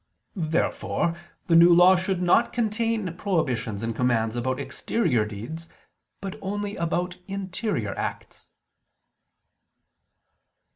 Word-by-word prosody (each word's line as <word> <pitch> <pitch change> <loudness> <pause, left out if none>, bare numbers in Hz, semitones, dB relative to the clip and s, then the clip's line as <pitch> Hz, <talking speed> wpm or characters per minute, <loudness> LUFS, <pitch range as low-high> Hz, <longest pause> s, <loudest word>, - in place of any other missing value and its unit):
Therefore 165 0 0 0.3
the 165 - +3
New 170 +1 +8
Law 180 +2 +7
should 185 0 -1
not 180 +7 +4
contain 225 -4 -1
prohibitions 125 - -1
and 115 -1 -2
commands 115 -2 +1
about 130 +2 -1
exterior 150 - 0
deeds, 120 +11 -7 0.5
but 195 -1 -6
only 205 +1 -3
about 175 +2 -2
interior 190 - -3
acts. - - -6
175 Hz, 100 wpm, -25 LUFS, 125-195 Hz, 0.5 s, New